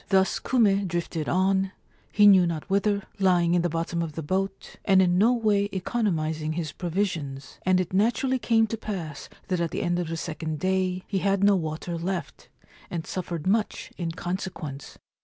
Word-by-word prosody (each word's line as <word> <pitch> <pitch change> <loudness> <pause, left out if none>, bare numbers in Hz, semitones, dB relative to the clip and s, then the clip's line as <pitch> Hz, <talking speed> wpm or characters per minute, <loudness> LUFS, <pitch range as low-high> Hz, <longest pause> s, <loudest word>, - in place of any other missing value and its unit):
Thus 190 -1 +3
Kume 205 -6 +2
drifted 170 -3 -3
on, 190 +1 +2 0.4
he 210 - +5
knew 190 -3 +7
not 160 -3 -4
whither, 200 0 +2 0.2
lying 175 -3 +3
in 175 - +3
the 175 - 0
bottom 165 +1 -2
of 165 -2 -3
the 160 - -5
boat, 195 +5 -3
and 190 -2 +5
in 180 -1 +4
no 225 +4 +5
way 210 -4 +2
economis 180 -6 -1
ing 155 +1 -2
his 160 -2 -3
provisions; 165 -7 -3
and 185 0 +4
it 185 0 -2
naturally 235 +6 +2
came 225 -2 +3
to 225 +1 -4
pass 170 -10 -6 0.2
that 180 -2 0
at 170 - 0
the - - -3
end 175 0 0
of 175 - -2
the 165 0 -3
second 160 -1 -4
day 185 +1 0
he 195 - -1
had 195 +1 +1
no 200 0 +6
water 165 0 -3
left, 180 +1 -4 0.4
and 165 -2 -4
suffered 175 -4 -4
much 210 +3 0
in 170 -2 -3
consequence. 170 -5 -5
185 Hz, 185 wpm, -26 LUFS, 165-200 Hz, 0.4 s, knew